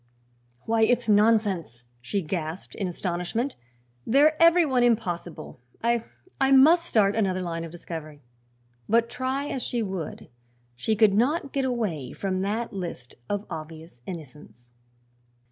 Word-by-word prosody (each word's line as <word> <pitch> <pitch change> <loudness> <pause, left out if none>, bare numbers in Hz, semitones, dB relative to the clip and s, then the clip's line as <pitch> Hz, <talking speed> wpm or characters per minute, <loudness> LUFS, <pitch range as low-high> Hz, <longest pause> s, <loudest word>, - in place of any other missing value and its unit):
"Why, 225 0 0
it's 245 +2 +3
nonsense!" 205 - +2 0.2
she 195 +10 -2
gasped 160 +1 -4
in 195 - -3
astonishment. 180 +8 -2 0.5
"They're 290 - +4
every 335 +1 +6
one 260 -4 +1
impossible. 185 - -1 0.2
I 235 0 +2 0.4
I 270 0 +3
must 320 +6 +6
start 205 -2 +3
another 190 -4 0
line 165 -1 -3
of 165 - -6
discovery." 155 -4 -8 0.7
But, 230 +1 +3
try 260 +3 -2
as 265 - -3
she 240 -1 -1
would, 190 -6 -5 0.5
she 215 - 0
could 215 -2 +5
not 275 +7 +1
get 275 -1 0
away 210 - -2
from 185 -1 -2
that 215 +4 -2
list 170 -10 -6 0.2
of 205 0 -2
obvious 160 -4 -9
innocents. 135 - -10
205 Hz, 135 wpm, -26 LUFS, 170-240 Hz, 0.7 s, every